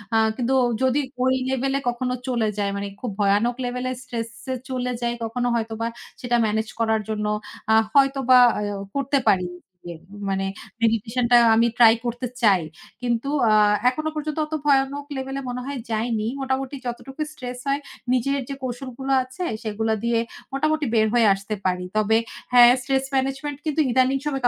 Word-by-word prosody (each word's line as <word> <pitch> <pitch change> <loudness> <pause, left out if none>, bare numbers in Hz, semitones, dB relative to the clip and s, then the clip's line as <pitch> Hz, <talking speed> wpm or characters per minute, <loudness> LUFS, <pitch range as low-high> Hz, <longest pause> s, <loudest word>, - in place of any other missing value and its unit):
আ - - +5 0.2
কিন্তু 255 +1 0 0.3
যদি 260 +2 +3 0.2
ওই 260 - +3 0.2
লেভেলে 270 +1 0
কখনো 250 +1 -2
চলে 235 -3 +1
যায় 200 -1 0
মানে 200 0 -3
খুব 245 - -3
ভয়ানক 205 +4 +2
লেভেলে 250 +1 -2
স্ট্রেস 230 -2 -4 0.2
এ - - 0 0.2
চলে 250 -1 -2
যাই 240 0 0
কখনো 245 +2 -1
হয়তোবা 225 0 -2 0.3
সেটা 245 -1 0
মেনেজ 220 +1 0
করার 220 -1 +2
জন্য 210 -1 -2 0.5
আ - - +6 0.2
হয়তোবা 270 -2 +5 0.2
আ - - -2 0.3
করতে 275 0 +1
পারি। 185 -2 +2 0.4
এ - - -6 0.4
মানে 195 0 -1 0.4
মেডিটেশনটা 230 +2 +2 0.2
আমি 230 +1 +4
ট্রাই 225 -2 +8
করতে 240 +1 -2
চাই। 200 -5 +5 0.4
কিন্তু 240 +2 -1 0.2
আ - - +4 0.4
এখনো 310 +4 -3
পর্যন্ত 305 0 -3
অত 305 - -10
ভয়ানক 280 0 +2
লেভেলে 270 +1 -4
মনে 250 0 -4
হয় 280 -1 -4
যাইনি। 220 0 -1
মোটামুটি 265 +1 -2
যতটুকু 265 +4 -6
স্ট্রেস 250 -4 -7
হয় 275 +1 +1 0.3
নিজের 275 +3 +1
যে - - -3
কৌশলগুলো 255 +1 -5
আছে 260 +8 -7 0.2
সেগুলা 220 +1 -1
দিয়ে 235 -1 +2 0.3
মোটামুটি 310 +2 +1
বের 220 0 +4
হয়ে 235 -3 +5
আসতে 200 +2 -4
পারি। 180 -1 0
তবে 215 +1 +3 0.4
হ্যাঁ, 245 -1 +9
স্ট্রেস 270 +1 0
ম্যানেজমেন্ট 270 +2 -1
কিন্তু 310 0 +1
ইদানিং 260 +2 +3
সম 295 - -1
245 Hz, 160 wpm, -23 LUFS, 225-270 Hz, 0.5 s, হ্যাঁ